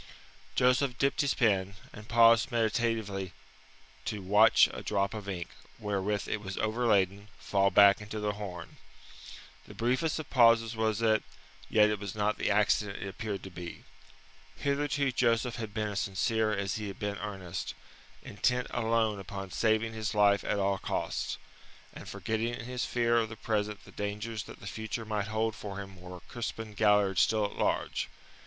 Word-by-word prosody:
Joseph 125 +1 +3
dipped 140 0 +2
his 140 -2 +1
pen, 100 -4 +2 0.2
and 105 +1 -11
paused 115 +2 +5
meditatively 110 -4 0 0.7
to 105 -3 -3
watch 105 +4 +6
a - - -6
drop 100 -1 0
of 105 -2 -6
ink, 85 -3 -4 0.3
wherewith 105 0 -2
it 105 - -2
was 95 -2 -6
overladen, 105 -3 +1
fall 100 -1 +2
back 100 0 +6
into 105 +1 -6
the 105 0 0
horn. 95 -5 -8 0.9
The - - -11
briefest 130 +7 0
of 155 - -5
pauses 115 -2 +5
was 110 0 0
it, 110 -1 +4 0.5
yet 105 -1 +5
it 105 - -2
was 100 -1 -6
not 105 0 0
the - - 0
accident 105 0 +2
it - - -4
appeared 100 0 -5
to 95 - -8
be. 85 -1 -8 0.7
Hitherto 140 -1 0
Joseph 120 -1 +1
had 110 -3 -5
been 105 0 -2
as 100 -1 -2
sincere 110 +3 0
as 100 -1 -1
he 105 -1 -4
had 100 - -7
been 100 -1 -3
earnest, 95 -4 -5 0.5
intent 125 +4 0
alone 115 -3 +1
upon 95 0 -7
saving 110 +4 +1
his 110 -1 -3
life 100 -1 +4
at - - -1
all 100 -1 +1
costs, - - -2 0.6
and - - -9
forgetting 115 +1 -2
in 120 - -8
his 125 0 -3
fear 120 -1 +2
of 110 -1 -1
the 110 - -7
present 105 -2 -2
the - - -14
dangers 105 +2 -4
that - - -12
the - - -10
future 110 +2 -4
might 105 -1 -2
hold 110 0 -1
for 100 -2 -7
him 95 -2 -9
were 90 -1 -9
Crispin 115 0 -6
Galliard 105 -3 +3
still 110 -2 +3
at 100 - -4
large. - - -1
105 Hz, 170 wpm, -30 LUFS, 100-115 Hz, 0.9 s, watch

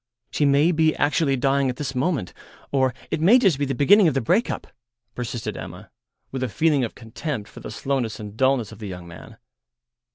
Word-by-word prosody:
"She 150 - +1
may 145 +4 +4
be 160 -1 +2
actually 145 -1 +1
dying 135 +1 +1
at 125 - -3
this 140 0 -4
moment, 135 - -1 0.4
or 130 -2 +2 0.2
it 155 - -1
may 200 +10 +7
just 190 - +3
be 145 - +1
the 135 - -2
beginning 195 +6 +6
of 150 - +1
the - - +3
break 170 - +1
up," - - -4 0.5
persisted 120 -2 -4
Emma, - - -9 0.4
with 130 - -4
a 130 - -1
feeling 150 +4 +2
of 115 - -4
contempt 115 0 -5
for - - -12
the - - -8
slowness 130 -6 -2
and 105 -1 -8
dulness 130 -3 +1
of 110 - -12
the 105 - -6
young 90 -2 -8
man. 85 - -12
135 Hz, 205 wpm, -23 LUFS, 115-150 Hz, 0.5 s, may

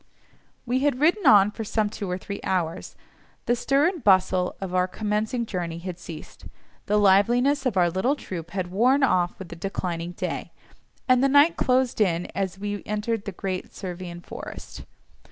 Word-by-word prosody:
We 250 +1 +1
had 280 -2 +1
ridden 335 +3 +3
on 205 -3 +7
for 225 - -6
some 215 0 0
two 205 -2 -5
or 180 - -1
three 200 +2 -6
hours; 170 -3 -2 0.5
the 240 - +2
stir 275 +5 +2
and 350 -7 -3
bustle 185 -2 +3
of 190 -2 -5
our 180 0 +2
commencing 215 +4 -2
journey 175 -5 -4
had 175 0 -7
ceased, 160 -3 -10 0.4
the 210 - +2
liveliness 240 +8 +4
of 215 -6 -1
our 175 -1 +5
little 190 - +1
troop 175 - -7
had 180 -1 -4
worn 255 +8 +3
off 180 -8 +2
with 190 -3 -9
the 170 - -8
declining 175 -1 -4
day, - - -4 0.5
and 255 0 +4
the 275 - +4
night 285 +4 +5
closed 255 -2 +1
in 175 -4 +2
as 190 -2 -2
we 205 0 -4
entered 210 +1 -2
the 200 - -4
great 185 0 -5
Servian 175 -2 -7
forest. - - -9
200 Hz, 175 wpm, -25 LUFS, 180-245 Hz, 0.5 s, on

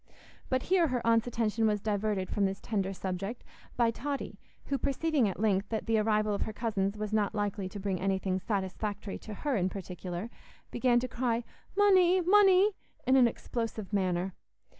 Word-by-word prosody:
But 260 0 +1
here 360 -2 +3
her 250 -4 -2
aunt's 230 0 +3
attention 225 -1 +1
was 210 -1 +1
diverted 205 -2 -1
from 205 - 0
this 195 0 -2
tender 195 -4 -2
subject 195 +4 -4 0.3
by 235 -1 +3
Totty, 280 +4 -4 0.3
who, 275 -1 -1
perceiving 280 -4 +1
at 185 - -6
length 205 -2 +1
that 220 -1 -2
the 225 -1 +2
arrival 215 -1 +2
of 200 - -2
her 220 - -2
cousins 205 -3 -1
was 215 0 -4
not 215 0 +1
likely 205 -2 -2
to 205 - -7
bring 190 -2 -2
anything 190 -1 0
satisfactory 200 0 -3
to 215 - -8
her 285 +4 -1
in 185 -3 +1
particular, 185 +2 -6 0.4
began 240 0 +3
to 255 - -2
cry, 240 -1 -1 0.3
"Munny, 375 -3 +5
munny," 385 +2 +5 0.3
in 260 +1 +4
an 255 -2 +7
explosive 225 -3 -4
manner. 185 -1 0
215 Hz, 175 wpm, -30 LUFS, 195-245 Hz, 0.4 s, an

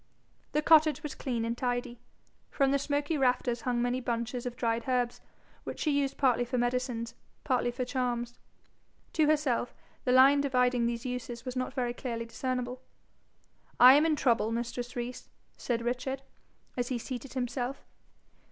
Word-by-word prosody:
The 300 - +1
cottage 310 -2 +5
was 300 - -4
clean 235 -4 -2
and 230 0 -1
tidy. 245 -1 -2 0.5
From 275 -1 +2
the 280 - +2
smoky 290 +2 -1
rafters 250 -2 +1
hung 240 -1 0
many 245 +1 0
bunches 240 +1 -2
of 245 - -5
dried 230 -1 -1
herbs, 245 -2 0 0.4
which - - -6
she 305 - +1
used 280 -1 0
partly 250 -3 +3
for 250 +1 -2
medicines, 245 -1 -1 0.3
partly 250 -3 +1
for 250 +1 -3
charms. 240 -2 -2 0.7
To 310 -2 +3
herself, 290 -6 +1 0.3
the 250 - +1
line 270 +3 +7
dividing 250 -3 +2
these 235 0 -3
uses 245 -1 -5
was 255 0 -4
not 255 +1 -3
very 245 -2 -1
clearly 235 -2 -4
discernible. 250 +1 -3 1.0
'I 250 +1 +10
am 295 +3 +5
in 315 - +2
trouble, 235 -5 +2
mistress 240 +1 -4
Rees,' 245 +1 -5 0.3
said 235 -2 -2
Richard, 255 +3 -2 0.5
as 245 -1 -1
he 255 - -1
seated 250 +2 -6
himself. 250 +1 -3
250 Hz, 160 wpm, -30 LUFS, 240-265 Hz, 1.0 s, I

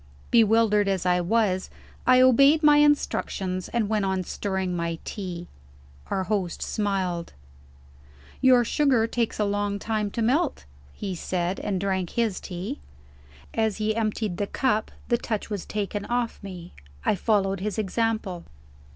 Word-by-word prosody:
Bewildered 220 -2 +4
as 190 -2 0
I 180 0 +3
was, 190 0 +1 0.4
I 255 0 +7
obeyed 275 +5 +6
my 295 -1 +7
instructions, 195 -10 +1
and 235 -3 0
went 215 -1 0
on 190 -1 0
stirring 190 -1 -2
my 170 -1 -2
tea. 175 -4 -5 0.6
Our 190 - 0
host 190 -4 -2
smiled. 190 -5 -2 1.1
"Your 255 -2 +6
sugar 260 -4 +3
takes 230 0 -1
a 210 - +2
long 205 0 -1
time 215 0 -2
to 230 +3 -2
melt," 285 +7 +1 0.3
he 195 -2 -4
said 180 +1 -2
and 195 -3 -2
drank 190 -2 -1
his 225 -5 0
tea. 180 - -6 0.7
As 220 -2 0
he 215 0 0
emptied 215 -4 -1
the 205 - -1
cup, 220 -3 0 0.2
the 240 - +2
touch 220 -1 -3
was 200 -4 -4
taken 205 0 -3
off 240 -1 -1
me. 180 -3 -9 0.3
I - - +3
followed 195 -1 +1
his 205 +2 -3
example. 215 -3 -1
205 Hz, 145 wpm, -25 LUFS, 190-230 Hz, 1.1 s, I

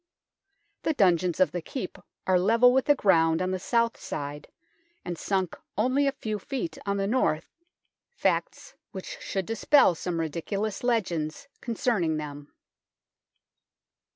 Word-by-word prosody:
The 315 - 0
dungeons 180 - +3
of 185 -5 +4
the 175 +1 -3
Keep 190 - -6 0.3
are 185 -1 +4
level 230 +6 +5
with 265 0 +2
the 290 - +5
ground 165 -8 +3
on 185 0 -1
the 185 - -1
south 230 +4 +1
side, 145 0 -5 0.6
and 175 - -3
sunk 190 0 -1 0.2
only 255 +6 +2
a - - +3
few 215 -5 -4
feet 275 - -4
on 200 0 +1
the 195 - 0
north, 205 -8 0 0.6
facts 485 - -1 0.2
which - - -7
should 195 -2 -2
46 225 +3 -4
THE - - -12
TOWER 295 - +8
OF - - +7
LONDON - - +5
dispel - - -11
some 175 -2 -2
ridiculous 195 +7 -3
legends 180 - -1
concerning 215 -9 0
them. 145 -1 -7
195 Hz, 155 wpm, -27 LUFS, 170-235 Hz, 0.6 s, TOWER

